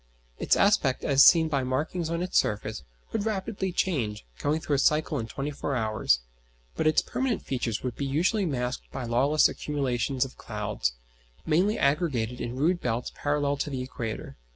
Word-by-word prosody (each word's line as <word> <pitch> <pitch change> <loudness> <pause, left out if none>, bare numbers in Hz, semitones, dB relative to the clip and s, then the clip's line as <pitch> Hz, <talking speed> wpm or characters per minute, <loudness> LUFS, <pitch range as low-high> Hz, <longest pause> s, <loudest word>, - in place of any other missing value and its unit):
Its - - +3
aspect, 175 -11 +3
as 140 -1 +6
seen 165 -2 +7
by 140 -4 0
markings 155 +6 -2
on 170 +1 -1
its 185 - -5
surface, 105 -3 +1 0.3
would 220 - -1
rapidly 195 -2 -2
change, 125 - -1
going 150 +2 0
through 155 -2 -2
a - - +1
cycle 150 0 +2
in 110 - -4
twenty 140 +5 -4
four 140 -1 -3
hours; 110 - +1 0.5
but - - +1
its 155 - +4
permanent 260 -4 -2
features 120 -4 -2
would 125 -2 -3
be 140 - -3
usually 175 +10 +1
masked 125 - -3
by 130 - -5
lawless 135 +6 +4
accumulations 135 -2 -1
of 135 - -12
cloud, 105 - -2 0.6
mainly 185 +7 +2
aggregated 140 -6 0
in 120 +1 -4
rude 170 +6 +1
belts 120 0 -2
parallel 145 -1 0
to 145 - -2
the 130 -2 -3
equator. 115 -4 -6
140 Hz, 175 wpm, -27 LUFS, 120-160 Hz, 0.6 s, seen